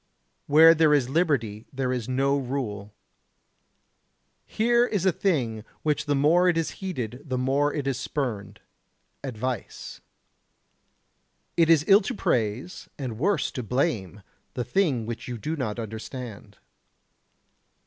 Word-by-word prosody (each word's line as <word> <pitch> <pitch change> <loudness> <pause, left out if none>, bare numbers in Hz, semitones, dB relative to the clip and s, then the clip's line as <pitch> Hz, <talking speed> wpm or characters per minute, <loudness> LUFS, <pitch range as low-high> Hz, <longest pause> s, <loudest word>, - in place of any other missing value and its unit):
Where 160 +3 +8
there 155 -2 +4
is 130 -4 +1
liberty, 135 - 0
there 130 -2 -1
is 125 -1 -4
no 135 +2 +2
rule. 120 -7 -4 1.6
Here 235 +2 +2
is 200 -5 -1
a 190 - +5
thing 125 - -1 0.2
which 150 -1 0
the 145 - +2
more 165 +6 +4
it 170 - +1
is 165 - -1
heeded 125 - -4
the 130 -4 -3
more 135 +3 +1
it 145 -2 -3
is 135 -3 -1
spurned, 105 -8 -4 0.6
advice. 125 -2 -5 1.5
It 165 -1 +3
is 160 -2 +5
ill 200 +1 +7
to 190 - -4
praise, 120 - -2
and 125 -6 -5
worse 195 +7 +1
to 125 - -4
blame, 110 - -2 0.3
the 125 - -1
thing 130 - +1
which 115 0 -6
you 120 -1 -4
do 155 +8 -3
not 125 -8 -3
understand. 110 -1 -7
135 Hz, 135 wpm, -26 LUFS, 115-155 Hz, 1.6 s, Where